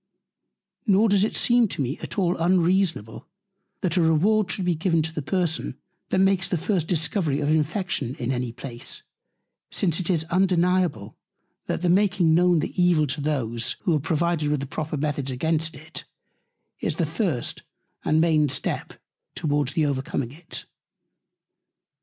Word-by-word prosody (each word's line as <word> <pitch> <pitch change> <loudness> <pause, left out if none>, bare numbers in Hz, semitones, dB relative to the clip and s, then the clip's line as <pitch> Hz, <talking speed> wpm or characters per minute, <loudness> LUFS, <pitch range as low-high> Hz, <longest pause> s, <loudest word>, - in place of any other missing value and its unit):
Nor 210 +2 +4
does 200 -1 +4
it 215 - -1
seem 240 -1 +4
to - - -7
me 135 +2 -2
at - - -7
all 180 -2 +2
unreasonable, 175 - +1 0.5
that 185 -1 0
a - - +4
Reward 180 +6 +3
should 185 - -1
be 180 - +2
given 165 0 +1
to 160 +1 -4
the 155 - -3
Person, 170 +1 -1 0.3
that - - +1
makes 190 -1 +3
the 180 - 0
first 175 -1 -1
Discovery 165 -3 0
of 145 - 0
Infection 155 - 0
in 120 +2 -3
any 125 -2 -2
Place; 120 0 -7 0.7
since 170 -3 0
it 180 - -2
is 165 -4 +2
undeniable, 180 - +1 0.5
that - - -2
the - - +2
making 190 -3 +3
known 175 -1 +4
the - - -4
Evil 175 -4 +4
to 140 +1 -3
those, 120 -6 -1
who 175 -5 +2
are - - +1
provided 160 +1 0
with 140 -2 -1
proper 155 -1 -3
Methods 140 -2 -2
against 160 +4 0
it, 155 +4 -8 0.7
is - - -2
the 165 - 0
first 160 - -2 0.4
and 155 - +2
main 155 -3 +3
Step 140 - -3 0.4
towards 145 -3 0
the 160 - +2
overcoming 135 -3 -2
it. 160 +4 -7
160 Hz, 160 wpm, -24 LUFS, 145-180 Hz, 0.7 s, Nor